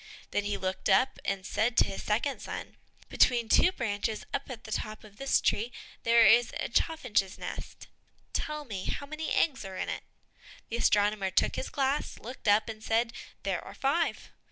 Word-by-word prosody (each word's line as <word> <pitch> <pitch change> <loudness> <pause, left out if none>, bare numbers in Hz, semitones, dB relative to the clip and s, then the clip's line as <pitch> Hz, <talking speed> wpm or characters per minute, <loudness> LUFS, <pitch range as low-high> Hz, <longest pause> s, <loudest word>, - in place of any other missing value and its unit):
Then 205 - 0
he 205 -1 -1
looked 185 0 -2
up 255 +8 +3
and 195 -2 -2
said 225 +3 0
to - - +8
his - - -5
second 240 +6 0
son, - - -6 0.3
"Between 240 -2 +3
two 360 - +5
branches 220 - -2
up 275 - -2
at 240 -3 -7
the 220 - -10
top 215 0 -3
of 205 -1 -15
this 275 0 +2
tree, 230 +4 +1 0.3
there 230 0 +6
is 235 +1 +6
a - - -2
chaffinch's 235 - +1
nest, - - -7 0.5
tell 300 -1 -2
me 200 -7 -5
how 285 - -3
many 310 +2 -4
eggs 280 -5 +2
there 190 -2 -7
are - - -6
in - - -2
it?" - - -3 0.7
The 230 - -2
astronomer 205 -3 +3
took 185 - +2
his - - -3
glass, 275 +1 -1
looked 245 0 -9
up, 205 +1 +5
and 220 -1 -7
said, 230 +1 +1 0.3
"There - - -1
are - - -10
five." 290 +5 0
230 Hz, 190 wpm, -30 LUFS, 205-265 Hz, 0.7 s, to